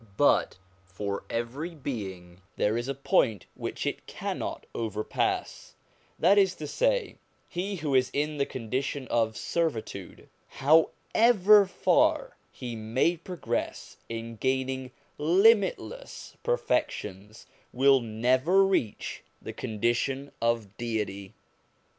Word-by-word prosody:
But - - +3 0.3
for 100 +2 -5
every 135 +9 -3
being 95 - -6
there 105 +1 +1
is 120 +2 -2
a 140 - -2
point 115 -6 +1
which - - -5
it - - -3
cannot - - -4
overpass; 110 -2 -2 0.4
that 195 +5 +5
is 190 -2 +3
to 155 - -6
say, - - 0 0.3
he 195 +3 -3
who 150 -5 -2
is 130 -1 +4
in 150 +1 -1
the 140 - 0
condition 130 +3 -3
of 110 -2 +1
servitude, 115 - -3 0.2
however 200 - +4
far - - +2 0.2
he 120 -3 -6
may 115 +10 +1
progress 165 -8 -4
in 115 0 -6
gaining 130 +1 -1 0.3
limitless 215 - +2
perfections, 105 - -2 0.3
will 135 +1 +5
never 130 - +3
reach 155 - -1 0.2
the - - -7
condition 120 +5 -1
of 115 -3 0
Deity. 105 -4 -3
130 Hz, 110 wpm, -28 LUFS, 110-170 Hz, 0.4 s, that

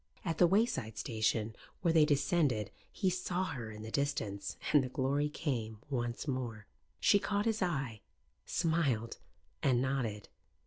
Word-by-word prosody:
At 165 -2 -1
the 175 - +7
wayside 165 - +1
station 110 0 0 0.3
where 170 -3 +3
they 160 -2 +7
descended 140 - +2 0.2
he 190 -3 +1
saw 180 0 -1
her 130 -11 -4
in 105 0 -8
the 110 - -7
distance, 110 -8 -2 0.2
and 145 -3 +7
the 130 - -3
glory 140 +3 +1
came 120 -8 -2
once 120 +1 -2
more. 120 -6 -3 0.3
She 200 - +5
caught 200 +1 0
his 225 -1 +1
eye, 135 - -1 0.4
smiled 155 -9 0 0.4
and 130 -3 +3
nodded. 125 -6 -1
135 Hz, 145 wpm, -33 LUFS, 110-165 Hz, 0.4 s, the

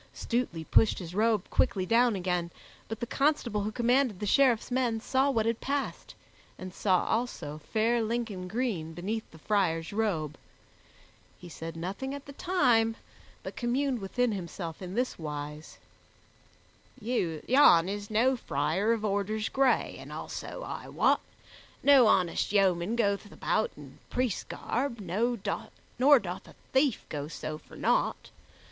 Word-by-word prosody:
Stutely 230 -9 -2
pushed 215 +6 +3
his 175 -2 -7
robe 220 +2 +2
quickly 185 -2 +2
down 235 +2 +3
again, 180 -2 -1 0.4
but 225 - -5
the - - 0
constable 275 -5 +1
who 210 +2 -2
commanded 245 -2 +2
the 210 - -3
Sheriffs 250 0 +3
men 245 -3 +1
saw 265 +4 +1
what 225 -5 +1
had 230 0 -1
passed, 280 0 -3 0.4
and 185 -1 -8
saw 185 -3 +2
also 220 -10 -2
fair 230 +2 +2
Lincoln 220 -5 -2
green 190 -7 -2
beneath 215 +6 -4
the 160 - -15
friar's 165 -2 0
robe. 175 -9 -1 1.0
He 175 - -11
said 165 0 -7
nothing 200 +11 -4
at 285 - -9
the 280 - -10
time, 250 -11 +2 0.5
but - - -7
communed 255 +1 0
within 240 +5 0
himself 170 -3 -5
in 185 +1 -6
this 250 -4 -1
wise: 150 0 -6 1.2
"Yon 210 - +4
is 205 +1 -4
no 240 +5 +3
friar 210 -2 0
of 220 -2 -2
orders 210 +1 -1
gray, 265 -1 +2
and - - -10
also, - - -6
I - - -6
wot, - - +3 0.6
no 275 -4 +7
honest 180 -4 +2
yeoman 195 0 +2
goeth 205 -2 0
about - - 0
in - - -13
priest's 250 -5 -1
garb, 245 -1 -3
nor 215 +6 0
doth 240 0 0
a - - -15 0.2
thief 265 -2 +2
go 145 -1 -4
so 155 -1 -6
for - - -16
nought. - - 0
215 Hz, 145 wpm, -29 LUFS, 180-245 Hz, 1.2 s, no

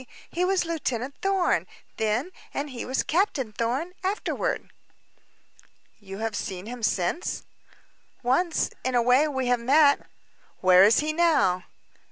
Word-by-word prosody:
"He 350 - -1
was 370 -1 +1
Lieutenant 280 -6 -3
Thorn, 390 -2 +1 0.3
then 220 +10 0 0.2
and 285 0 -3
he 245 - -6
was 260 +1 -1
Captain 305 - 0
Thorn, 255 - -2
afterward." 415 +5 -2 1.3
"You 195 -2 -9
have 225 0 -3
seen 185 -1 -5
him 245 +2 -7
since?" 215 - -1 0.8
"Once 315 +8 +1
in 255 0 -1
a 240 - +4
way 255 +5 +4
we 265 -3 -2
have 245 0 +2
met." 280 +4 +4 0.5
"Where 185 0 +6
is 215 +7 +5
he 305 +1 -1
now?" 310 - +2
260 Hz, 135 wpm, -26 LUFS, 225-330 Hz, 1.3 s, Where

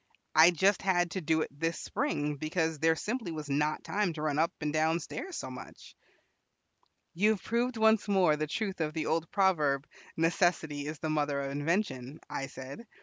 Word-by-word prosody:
I 160 +2 +8
just 190 +3 +2
had 175 -3 +1
to 190 - -3
do 160 0 +1
it - - -2
this 165 +4 -2
spring, 150 - -2
because 160 +1 -1
there 160 +1 +3
simply 215 +1 -3
was 155 -3 -5
not 150 +2 0
time 200 -4 0
to 155 -1 -5
run 150 -1 0
up 165 +1 +2
and 150 -1 -2
down 160 +2 +2
stairs 365 - -6
so - - -5
much." - - -11 1.2
"You 200 +5 +3
have 205 - -8
proved 235 +1 0
once 220 -1 +4
more 185 -6 +4
the 155 0 -2
truth 195 +2 -3
of 155 0 -2
the 155 -1 -1
old 165 0 0
proverb, 155 -8 +2 0.3
'Necessity 160 -3 +1
is 155 +1 -5
the 155 +1 -3
mother 145 -2 0
of 140 0 -3
invention,'" 145 - -2
I 135 - -4
said. 135 - -9
160 Hz, 190 wpm, -30 LUFS, 150-190 Hz, 1.2 s, I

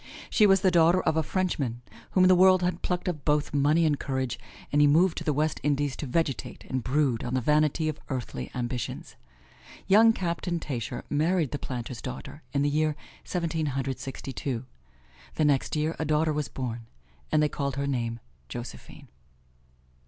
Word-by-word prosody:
She 210 - +5
was 195 -1 +5
the 190 -2 +4
daughter 170 +1 +5
of 160 - +1
a 160 - +3
Frenchman 145 -9 -2 0.3
whom 185 - +5
the 185 - +7
world 185 0 +6
had 180 +1 -1
plucked 180 0 -2
of 155 -5 -2
both 150 -1 +1
money 150 +4 +3
and 150 -2 +1
courage, 130 -3 -2 0.3
and 145 - +4
he 145 - +7
moved 165 +5 +4
to - - -7
the 155 - +1
West 150 +1 0
Indies 145 -1 0
to 145 - -5
vegetate 140 +1 -2
and 130 -2 -2
brood 135 -3 +1
on 125 +1 -2
the - - +2
vanity 150 +4 +2
of 155 -1 -3
earthly 120 - -4
ambitions. 120 -1 -4 0.7
Young 220 +4 +6
Captain 170 -3 -2
Tascher 125 -8 -4
married 160 0 +1
the 145 - -3
planter's 120 -1 -5
daughter 135 +3 -7
in 140 0 +1
the - - +2
year 155 +1 +1 0.3
Seventeen 165 -3 -2
Hundred 135 -1 -2
Sixty 135 0 -6
two. 130 -3 -3 0.7
The 155 - +2
next 140 0 +1
year 155 +2 0
a - - 0
daughter 155 +1 +2
was 150 -1 -2
born, 120 -3 -5 0.4
and 155 -1 +4
they - - +4
called 140 -2 -3
her 140 0 -1
name 120 -4 -2 0.3
Josephine. 120 - -8
150 Hz, 180 wpm, -27 LUFS, 130-165 Hz, 0.7 s, the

